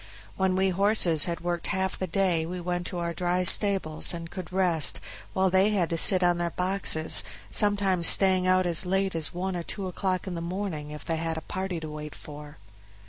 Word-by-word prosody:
When 190 -1 0
we 190 +1 +1
horses 185 -5 +4
had 170 -1 -4
worked 175 0 -3
half 190 -1 -2
the 185 - -3
day 180 -2 0
we 180 +1 -6
went 175 0 -4
to 180 - -6
our 170 -1 -3
dry 180 +1 -1
stables, 180 -4 +3
and 165 0 -9
could 185 -4 -8
rest, 180 -4 +1 0.3
while 190 -1 0
they 190 +2 +3
had 190 -6 -1
to - - -1
sit 185 +2 +4
on 175 -1 +1
their 170 0 -2
boxes, 180 -3 +2 0.3
sometimes 200 -4 +3
staying 185 -1 +4
out 185 0 +2
as 170 -1 0
late 190 +1 -1
as 160 -2 -3
one 185 +1 -4
or 175 - -4
two 195 +3 -7
o'clock 185 0 -3
in 190 - -6
the 170 - -5
morning 170 -4 -5
if 150 0 -10
they 165 - -2
had 165 0 -4
a - - -5
party 185 0 -5
to 160 - -7
wait 150 0 -8
for. 150 0 -12
180 Hz, 210 wpm, -26 LUFS, 165-190 Hz, 0.3 s, horses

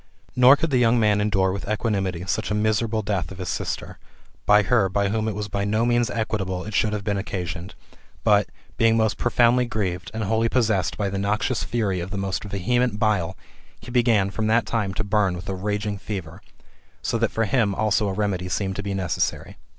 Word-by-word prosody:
Nor 125 +2 +8
could 160 +1 -2
the 130 - +3
young 120 0 +4
man 105 -2 +3
endure 95 -2 +2
with 100 +1 -5
equanimity 95 -5 -1
such 95 - -2
a 105 - 0
miserable 110 +1 0
death 100 -3 -2
of 95 - -9
his 90 -1 -5
sister, - - -4 0.5
by 105 0 +6
her 100 0 +2
by 100 +1 0
whom 110 +1 -1
it 110 - -2
was 105 0 -3
by 100 0 -2
no 110 +3 +1
means 120 0 +2
equitable 95 -6 -2
it 110 - -7
should 105 +2 +2
have 105 -1 -3
been 100 -1 -1
occasioned; 90 -2 -5 0.5
but, - - +3 0.3
being 115 0 +4
most 110 -1 +1
profoundly 120 +1 +3
grieved, 95 -5 -3
and 110 0 -3
wholly 110 +3 +1
possessed 110 -8 +1
by 105 - -1
the 100 0 -3
noxious 105 +5 0
fury 105 -6 -1
of 85 +2 -5
the 100 - -5
most 95 -1 -2
vehement 105 +4 0
bile, 100 -4 0 0.4
he 125 - -10
began, 115 -6 +3
from 110 +2 -2
that 115 +1 +3
time, 105 -4 -1
to - - -1
burn 100 -3 +1
with 90 +4 -8
a 95 - -2
raging 105 +1 -2
fever; 95 -7 -6 0.6
so 115 - -1
that 115 -1 +2
for 115 - 0
him 105 -2 +1
also 105 0 +1
a. - - -2
remedy 95 -3 -1
seemed 95 +1 -2
to 100 - -3
be 100 -1 -3
necessary. 90 -5 -2
105 Hz, 210 wpm, -23 LUFS, 95-110 Hz, 0.6 s, Nor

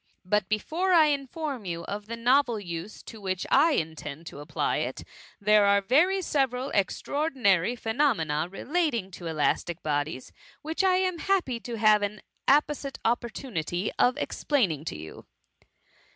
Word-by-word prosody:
But 200 0 +1
be 215 - +2
fore 360 - -1
I 315 -3 +6
inform 275 -2 -4
you 170 -2 -4
of 205 +4 -6
the 230 +1 -5
novel 245 -1 +3
use 175 +1 -7
to 220 - -11
which 185 -2 -2
I 310 +4 +5
in 160 - -1
tend 150 +2 -8
to 145 - -9
apply 145 - -1
it; - - -3 0.4
there 210 0 +4
are 200 0 +5 0.4
several 265 -3 0
very 200 - +4
extraor 290 +10 -3
dinary 200 - +2
phenomcnarelating 220 - 0
toelastic 170 0 -2
bodies, 145 -3 -2 0.3
which 320 +5 -1
I 375 -1 +4
am 370 -2 0
happy 350 -12 0
to 235 0 -6
have 215 -1 +5
an 205 +1 -3 0.2
apposite 285 -1 +2
opportunity 215 - -2
of 250 0 +4
explaining 185 - 0
to 75 - -4
you. 80 +1 -10
215 Hz, 150 wpm, -27 LUFS, 175-280 Hz, 0.4 s, I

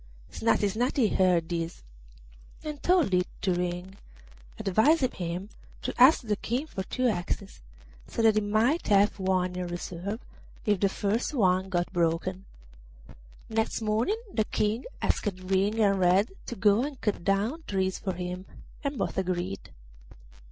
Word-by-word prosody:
Snati 225 -2 +2
Snati 235 +2 +1
heard 180 -3 +3
this 165 -1 -4 0.8
and 300 -2 -6
told 350 - +3
it 180 0 +3 0.2
to 185 - +2
Ring, 180 +2 -3 0.6
advising 255 - +3
him 180 +3 -4 0.3
to - - -2
ask 265 +5 +8
the 215 -3 -1
King 245 +8 -2
for 255 -11 -5
two 255 +6 -1
axes, 195 -1 -3 0.5
so 230 - -2
that 220 -1 +6
he 215 - +2
might 220 +10 +1
have 205 0 +4
one 185 -1 0
in 180 -1 -3
reserve 175 +4 -5 0.5
if 205 -4 +2
the 200 - +3
first 210 +9 -1
one 190 -4 +2
got 175 -1 -1
broken. 175 +2 0 1.0
Next 220 0 -1
morning 220 - +1 0.2
the 220 - +1
King 215 +4 -1 0.2
asked 210 - +1
Ring 195 +4 +1
and 200 -3 +3
Red 185 +4 +3 0.2
to 240 - -4
go 205 +2 +4
and 280 -2 -5
cut 205 -5 -1
down 210 - 0
trees 190 -1 -1
for 190 - -2
him, 180 +1 -5 0.4
and 280 -1 -2
both - - -1
agreed. 180 - -3
200 Hz, 150 wpm, -28 LUFS, 180-225 Hz, 1.0 s, ask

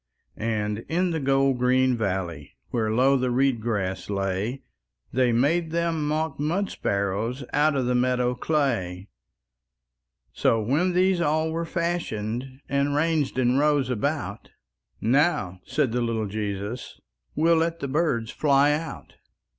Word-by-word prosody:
And 105 -1 -2
in 180 +2 +1
the 160 - -1
gold 135 -2 +2
green 130 +1 +3
valley, 95 -9 -3
Where 110 -3 0
low 130 +4 +4
the 130 0 0
reed 130 -1 +2
grass 100 -5 -2
lay, 100 +6 -2 0.5
They 125 0 +3
made 155 +8 +2
them 165 -2 -1
mock 155 -1 -1
mud 175 +7 0
sparrows 100 +6 -2
Out 150 +1 +3
of 130 -2 0
the 125 - +1
meadow 125 0 +1
clay. 115 - -1 1.2
So, 115 - +2
when 145 - +1
these 185 0 +3
all 155 0 +1
were 165 +1 -2
fashioned, 130 - -3
And 140 +1 0
ranged 150 -3 +1
in 130 +1 +3
rows 145 -3 +2
about, 115 -5 -2 0.5
"Now," 115 - +1
said 135 -2 +1
the 125 +1 0
little 115 -2 -1
Jesus, 105 +3 -4 0.4
"We'll 165 +2 +4
let 165 +1 0
the 140 - -3
birds 135 -6 0
fly 145 -1 +3
out." 160 +2 -5
130 Hz, 140 wpm, -25 LUFS, 110-155 Hz, 1.2 s, low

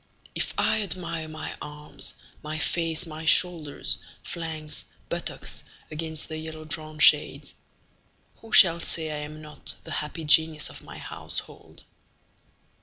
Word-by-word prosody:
If - - -2
I - - +1
admire 170 -4 -4
my 155 0 -8
arms, 150 0 0 0.3
my 155 +1 -6
face, 165 0 0
my 160 -1 -9
shoulders, 160 -3 +2 0.2
flanks, 160 -2 -5 0.2
buttocks - - -3 0.3
against 160 0 -5
the 155 -1 -7
yellow 155 0 -8
drawn 155 0 -3
shades, 150 0 +3 0.8
Who 225 - -17
shall 170 -3 +9
say 160 -2 +2
I 150 - -5
am 150 +1 -9
not 150 0 -6
the - - -10
happy 150 +2 -5
genius 155 0 +5
of - - -11
my - - -13
household? - - -1
155 Hz, 130 wpm, -24 LUFS, 150-165 Hz, 0.8 s, shall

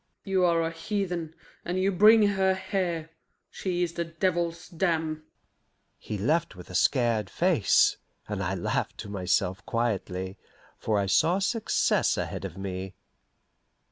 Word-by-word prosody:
"You 190 -2 +1
are 170 -1 +3
a 165 - -1
heathen, 175 -2 -3 0.3
and 180 +2 -2
you 195 +1 +2
bring 215 +4 +7
her 190 -1 +2
here. 175 -4 -2 0.4
She 180 -2 -2
is 170 -1 -2
the 170 - -2
devil's 170 0 -1
dam." 160 -3 -1 0.7
He 105 - -5
left 150 - 0
with 90 0 -11
a - - -9
scared 115 -1 +2
face, - - +3 0.3
and 105 -2 -3
I 95 0 -1
laughed 90 - -2
to 105 - -8
myself 95 0 0
quietly, 95 -5 -2 0.4
for 110 -2 0
I 100 - +1
saw 160 - +3
success 215 +3 +1
ahead - - -3
of 90 - -7
me. 95 -1 -5
165 Hz, 140 wpm, -27 LUFS, -, 0.7 s, bring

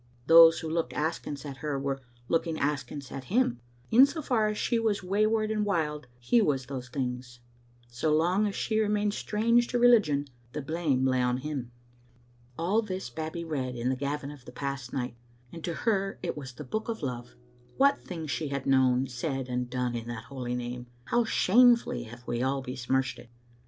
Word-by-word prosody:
Those 165 0 +8
who 160 - -4
looked 165 +1 -1
askance 150 -2 -3
at 140 -2 -6
her 145 0 -2
were 135 0 -2 0.3
looking 165 -1 0
askance 140 -1 -3
at 135 -1 -6
him; 190 - +1 0.3
in 255 +5 +8
so 315 - -5
far 225 -5 +2
as 210 0 -2
she 235 - +1
was 215 -4 0
way 200 +4 +2
ward 215 -1 +1
and 215 -1 0
wild, 150 -8 -1
he 175 - +3
was 140 - +1
those 130 -2 -6
things; 125 -2 -4 0.5
so 125 +6 -1
long 175 +7 +3
as 200 - -4
she 220 -1 0
re 215 - +2
mained 210 0 +1
strange 230 +3 +2
to 245 - -1
religion, 215 -13 +4 0.3
the 150 - -3
blame 145 -4 0
lay 130 -1 +2
on 125 0 +1
him. 135 -3 -4 0.9
All 190 +7 +2
this 185 - -5
Babbie 160 +5 -5
read 130 -6 -3
in 120 +1 -1
the 130 - +1
Gavin 140 +1 -3
of 140 -4 -13
the - - -10
past 135 -1 -4
night, 125 -2 -3 0.4
and 165 -1 -9
to 170 - -2
her 195 -2 0
it - - -2
was 135 -4 -7
the 150 - -8
book 220 - -4
of 225 -8 -4
love. 120 - -5 0.4
What 280 +1 +4
things 160 -5 -6
she 155 - -2
had 140 -1 -3
known, 130 -1 +3
said 135 +1 -3
and 125 0 -2
done 125 -1 -1
in 115 -1 -4
that 120 -2 -5
holy 125 -3 -4
name! 125 0 -5 0.2
How 240 0 +2
shamefully 235 +3 +4
have 120 +2 -12
we 120 0 -1
all 135 +1 0
besmirched 130 +1 -1
it - - -14
145 Hz, 200 wpm, -29 LUFS, 130-195 Hz, 0.9 s, Those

